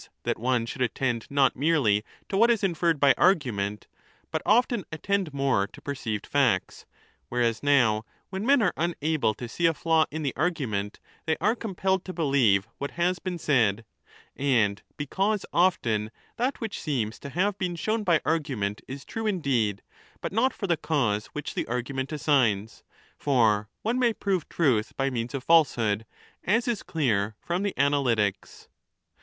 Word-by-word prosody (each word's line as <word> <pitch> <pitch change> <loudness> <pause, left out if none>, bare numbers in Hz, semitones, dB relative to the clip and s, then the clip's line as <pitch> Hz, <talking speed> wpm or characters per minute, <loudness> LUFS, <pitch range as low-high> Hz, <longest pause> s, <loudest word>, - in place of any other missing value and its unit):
that - - -1
one 120 0 +1
should 130 +3 -6
attend 120 -2 -1
not 140 -1 +3
merely 135 -8 +2 0.2
to - - -3
what 230 +4 +5
is 230 -3 +2
inferred 170 -4 +1
by 140 -1 +6
argument, 115 - +1 0.5
but - - -1
often 235 -1 +3
attend 185 +2 -1
more 135 -8 +1
to - - -15
perceived 115 -7 -4
facts 125 -10 0 0.2
— 70 - -37
whereas 120 -2 0
now 120 -7 +3 0.3
when 190 +1 -3
men 270 0 +4
are 180 - +2
unable 155 -8 0
to 120 - -6
see 170 +8 +1
a 165 - +1
flaw 160 0 +2
in 155 +1 -5
the 135 - -2
argument 130 - -2 0.3
they 160 - +1
are 215 +3 +2
compelled 190 -4 -1
to 185 - -6
believe 135 - +2
what 140 - -3
has 180 +1 +1
been 185 -2 -4
said 115 -9 +1 0.3
— - - -29
and 115 -8 +1 0.2
because 195 +8 -1
often 120 - +2
15 110 - -12 0.3
that 255 +4 -1
which 225 -4 -5
seems 120 -8 -2
to 140 - -8
have 185 +7 0
been 180 -2 -2
shown 215 +6 -1
by 170 -5 +3
argument 130 -11 -1
is 135 +1 -8
true 225 -1 -4
indeed, 125 - 0 0.4
but - - -5
not 245 +5 +3
for 200 - -5
the 175 -3 +2
cause 120 -11 0
which 150 - -6
the - - -3
argument 130 +3 -3
assigns; 120 -9 +1 0.4
for 110 -7 +2
one 235 +4 0
may 240 -2 +3
prove 190 -6 -2
truth 125 -10 +1
by 135 0 0
means 120 +1 -3
of 135 - -4
falsehood, 115 -10 +3 0.4
as 230 +6 +1
is 235 -4 0
clear 110 - 0
from 175 +2 -2
the 200 -1 -1
Analytics. 120 -9 0
140 Hz, 170 wpm, -26 LUFS, 115-180 Hz, 0.5 s, by